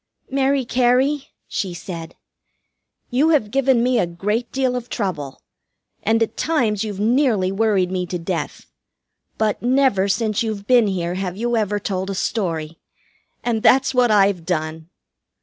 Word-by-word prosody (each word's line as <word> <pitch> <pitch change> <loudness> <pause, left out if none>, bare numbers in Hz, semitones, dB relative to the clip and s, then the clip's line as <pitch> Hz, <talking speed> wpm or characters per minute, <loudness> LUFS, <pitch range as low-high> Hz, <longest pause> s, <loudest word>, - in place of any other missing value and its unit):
"Mary 270 0 +1
Cary," 260 +4 +2 0.2
she 185 -4 -3
said, 170 -2 -7 1.0
"you 275 +6 +3
have 275 -10 +2
given 265 -2 +3
me 250 -1 +2
a 175 - +1
great 210 +8 -2
deal 260 -2 0
of 245 -1 -5
trouble, 155 - -4 0.6
and 225 +1 +2
at 225 - -4
times 230 -11 0
you've 205 -3 -5
nearly 220 -4 +2
worried 195 -3 +1
me 180 -1 -2
to 180 - -3
death. 165 -2 -4 0.7
But 215 -1 0
never 250 -6 +2
since 215 +1 0
you've 215 -3 -3
been 240 -2 +4
here 175 -3 -2
have 185 0 -4
you 240 +2 0
ever 205 -2 0
told 190 -1 -3
a 195 - -3
story, 165 -6 -2 0.6
and 230 -2 0
that's 265 +3 +4
what 250 -1 +3
I've 200 -4 +3
done." 160 -1 -3
210 Hz, 150 wpm, -21 LUFS, 185-245 Hz, 1.0 s, been